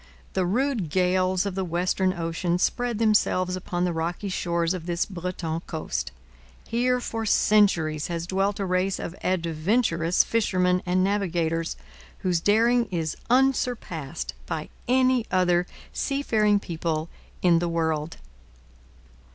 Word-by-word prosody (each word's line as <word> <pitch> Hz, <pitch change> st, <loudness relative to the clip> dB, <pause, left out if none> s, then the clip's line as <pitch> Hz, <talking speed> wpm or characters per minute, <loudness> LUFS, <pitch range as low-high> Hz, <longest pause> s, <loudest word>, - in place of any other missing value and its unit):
The 185 Hz, -2 st, +1 dB
rude 235 Hz, -, 0 dB
gales 185 Hz, +2 st, +2 dB
of 200 Hz, -, -2 dB
the 190 Hz, 0 st, -2 dB
western 180 Hz, +2 st, 0 dB
ocean 170 Hz, 0 st, -1 dB
spend 240 Hz, +5 st, 0 dB
themselves 205 Hz, -4 st, +2 dB
upon 180 Hz, -1 st, -2 dB
the 175 Hz, -, 0 dB
rocky 170 Hz, +5 st, -3 dB
shores 170 Hz, -1 st, 0 dB
of 180 Hz, -2 st, -6 dB
this 170 Hz, 0 st, 0 dB
Breton 175 Hz, -3 st, -4 dB
coast. 155 Hz, -, -3 dB, 0.6 s
Here 250 Hz, +2 st, +1 dB
for 225 Hz, -2 st, -4 dB
centuries 190 Hz, -8 st, +3 dB
has 170 Hz, -1 st, -3 dB
dwelt 195 Hz, +2 st, 0 dB
a 195 Hz, -, -1 dB
race 185 Hz, +1 st, 0 dB
of 175 Hz, -, -6 dB
adventurous 170 Hz, +1 st, +1 dB
fishermen 185 Hz, -5 st, +1 dB
and 185 Hz, +1 st, +2 dB
navigators, 170 Hz, -4 st, 0 dB, 0.5 s
whose 180 Hz, -3 st, +1 dB
daring 230 Hz, +6 st, +3 dB
is 165 Hz, -4 st, -2 dB
unsurpassed 240 Hz, -, 0 dB
by 155 Hz, -1 st, -4 dB, 0.2 s
any 255 Hz, -1 st, +3 dB
other 180 Hz, -1 st, +2 dB, 0.3 s
seafaring 220 Hz, -7 st, +1 dB
people 165 Hz, -3 st, -3 dB, 0.4 s
in 170 Hz, -2 st, +5 dB
the 170 Hz, 0 st, -1 dB
world. 160 Hz, -1 st, -1 dB
180 Hz, 125 wpm, -25 LUFS, 170-205 Hz, 0.6 s, in